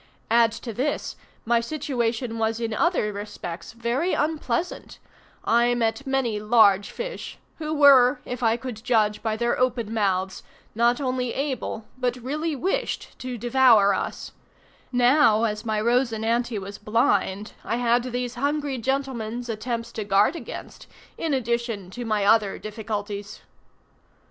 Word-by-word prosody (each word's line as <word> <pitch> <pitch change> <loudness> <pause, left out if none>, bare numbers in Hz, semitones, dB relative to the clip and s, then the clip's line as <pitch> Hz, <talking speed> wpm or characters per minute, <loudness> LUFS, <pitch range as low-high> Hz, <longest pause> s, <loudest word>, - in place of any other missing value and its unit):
Add 230 -1 +5
to 230 0 -6
this, 265 +7 -2 0.3
my 235 +1 +3
situation 240 -3 -2
was 220 0 0
in 230 -1 -2
other 220 - +1
respects 200 -4 -7
very 240 +9 -1
unpleasant; 305 +1 -2 0.5
I 235 +1 +3
met 240 +4 -1
many 260 -6 0
large 210 -3 +4
fish, - - -6 0.2
who 305 -1 -3
were, 280 -3 +6
if 250 0 -5
I 230 -1 +3
could 240 -3 -7
judge 215 -4 +2
by 220 -1 -1
their 235 +1 0
open 245 -3 0
mouths, 190 -3 0 0.3
not 235 +3 +2
only 255 -3 -2
able, 265 -5 -3
but 250 -1 0
really 295 +6 -3
wished 360 +8 -2
to 255 -1 -5
devour 235 -4 +5
us; - - -4 0.6
now, 245 -2 +4
as 215 0 -1
my 215 -1 0
Rosinante 235 0 +1
was 200 +1 -8
blind, 210 -2 +1
I - - -1
had 240 0 +2
these 245 -1 -3
hungry 285 +1 -1
gentlemen's 245 -2 -2
attempts 230 +1 -3
to 215 - -4
guard 200 - +3
against, - - -8 0.3
in 325 - -2
addition 235 -6 -2
to 245 +4 -6
my 215 -2 0
other 205 -2 +3
difficulties. 210 -1 -5
235 Hz, 140 wpm, -25 LUFS, 215-255 Hz, 0.6 s, were